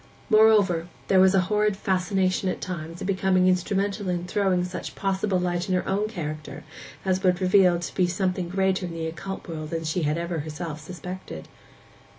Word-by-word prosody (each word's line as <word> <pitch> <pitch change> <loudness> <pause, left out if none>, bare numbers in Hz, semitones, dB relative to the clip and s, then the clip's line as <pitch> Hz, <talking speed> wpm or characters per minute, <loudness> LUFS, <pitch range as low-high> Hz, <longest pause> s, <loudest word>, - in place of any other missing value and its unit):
Moreover, 210 -6 +5 0.2
there 190 - +5
was 190 +1 +6
a 190 - +5
horrid 210 +1 +1
fascination 190 0 0
at - - -3
times 170 -2 -6
in - - -3
becoming 190 -1 +2
instrumental 195 +2 0
in 175 -1 -1
throwing 185 -1 +1
such 180 0 -6
possible 195 0 0
light 180 +1 -1
on 185 - +2
her 180 - -1
own 200 +2 0
character 155 -7 -6 0.4
as 190 0 +1
would 180 -2 +2
reveal 185 -1 +5
her 170 - -1
to - - -5
be 180 -2 +2
something 185 -1 -1
greater 190 0 0
in 170 - -7
the 165 -1 -3
occult 190 +5 -6
world 155 -2 -5
than 165 0 -3
she 160 +3 -1
had 150 0 0
ever 170 -1 -2
herself 155 +1 -5
suspected. 180 - -8
185 Hz, 185 wpm, -25 LUFS, 170-195 Hz, 0.4 s, was